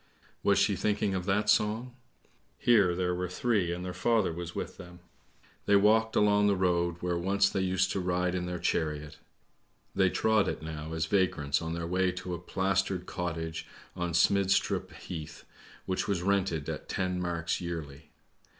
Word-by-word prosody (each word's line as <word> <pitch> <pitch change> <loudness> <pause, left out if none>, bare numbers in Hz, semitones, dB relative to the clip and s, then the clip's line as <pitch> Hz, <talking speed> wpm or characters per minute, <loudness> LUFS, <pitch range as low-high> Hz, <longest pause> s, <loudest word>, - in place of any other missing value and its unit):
Was - - +3
she - - +3
thinking 105 -1 0
of 90 -2 -2
that 105 +2 +1
song? 110 +4 +2 0.6
Here 100 -7 +4
there 90 0 0
were 90 0 -3
three 100 -2 0
and 90 +1 -4
their 90 - -4
father 105 0 +1
was 85 +1 -6
with - - -5
them. 90 0 -11 0.7
They 100 - +5
walked 110 +2 +4
along 105 0 +4
the 100 - +3
road 85 -2 +1
where 90 -1 -1
once 100 +2 +2
they 95 - -1
used 95 0 +1
to - - -1
ride 90 0 0
in 90 -1 -2
their 90 0 -3
chariot. 75 -3 -2 0.7
They 95 -1 +3
trod 110 +1 +2
it - - -3
now 80 0 -6
as 80 0 0
vagrants, 80 -6 +1
on 80 0 -3
their 85 0 -3
way 90 +2 +1
to 90 0 -5
a 85 - -4
plastered 95 0 -1
cottage 80 -3 -4 0.3
on 90 -2 -2
Smidstrup 100 +2 +2
Heath, 80 -4 -8 0.4
which 95 - -1
was 95 -4 -1
rented 95 -6 0
at - - -5
ten 90 -1 -1
marks 85 -1 -2
yearly. 80 -4 -6
90 Hz, 170 wpm, -30 LUFS, 85-100 Hz, 0.7 s, They